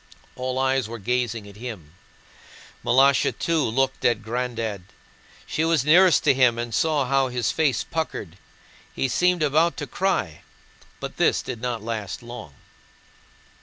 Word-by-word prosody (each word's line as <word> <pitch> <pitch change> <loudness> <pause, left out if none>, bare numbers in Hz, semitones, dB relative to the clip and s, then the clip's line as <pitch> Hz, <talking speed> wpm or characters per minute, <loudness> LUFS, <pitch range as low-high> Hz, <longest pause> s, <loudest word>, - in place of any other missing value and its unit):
All 130 0 -3
eyes 130 -3 +1
were 115 - -6
gazing 115 -1 -2
at 100 0 -13
him. 105 -10 -8 0.9
Malásha 135 +2 +3
too 165 -3 +1
looked 135 +3 0
at 120 -2 +2
"Granddad." 115 -3 -3 0.6
She 155 - -1
was 165 -4 +2
nearest 175 +1 +6
to - - +5
him 125 -3 +3
and 120 -1 -4
saw 145 +6 +1
how 135 +1 +2
his 125 -2 -1
face 145 -7 +1
puckered; 100 - -5 0.6
he 135 - 0
seemed 180 +6 +2
about 155 +4 +2
to - - -4
cry, 185 - -1 0.6
but - - -7
this - - +2
did 120 -3 -6
not 120 -3 -3
last 110 -2 -5
long. 120 - -9
125 Hz, 145 wpm, -24 LUFS, 115-140 Hz, 0.9 s, nearest